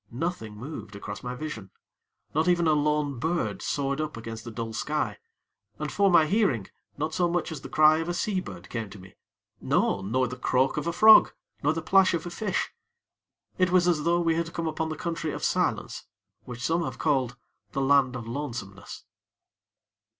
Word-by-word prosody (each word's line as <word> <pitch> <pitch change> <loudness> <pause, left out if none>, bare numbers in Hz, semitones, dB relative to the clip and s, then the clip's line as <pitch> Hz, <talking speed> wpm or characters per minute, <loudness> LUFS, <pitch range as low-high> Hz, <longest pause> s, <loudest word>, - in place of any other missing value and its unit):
Nothing 120 -6 -4
moved 115 -4 -8
across 100 0 -7
my 125 0 -5
vision 125 -8 -6 0.6
not 155 +3 +1
even 175 -1 +3
a 155 - +4
lone 150 -3 0
bird 165 +5 -1
soared 140 +1 -1
up 155 -5 -4
against 115 -1 -7
the - - -7
dull 115 0 -5
sky; 150 +6 -2 0.6
and, - - -4
for 200 -1 +3
my 170 -3 +6
hearing, 170 - +1 0.3
not 155 +2 -2
so 175 0 +1
much 175 -1 -1
as 150 -4 -6
the - - -9
cry 155 0 +5
of 165 +1 -3
a - - 0
sea 195 +1 0
bird 90 - -9
came 115 -3 -4
to 100 - -11
me 95 0 -14 0.5
no! 100 - +1
nor 125 +6 0
the 125 +1 -7
croak 130 +1 +1
of 150 +2 -2
a - - +1
frog, 215 +6 +7 0.3
nor 145 +2 +2
the 165 0 -4
plash 190 0 +4
of 165 - -4
a 175 - -5
fish. 210 +1 -2 0.9
It 185 0 +4
was 180 0 +4
as 160 -4 +2
though 170 +2 +2
we 165 -1 +2
had 165 +1 -2
come 170 - -2
upon 160 0 -2
the 155 - -4
Country 165 -3 -3
of - - -6
Silence, - - -1 0.4
which 125 -1 -6
some 165 +1 +1
have - - -5
called 130 -5 0 0.4
the 135 - -1
Land 135 -2 +3
of 115 -2 -6
Lonesomeness. 115 -7 -6
150 Hz, 195 wpm, -27 LUFS, 120-170 Hz, 0.9 s, frog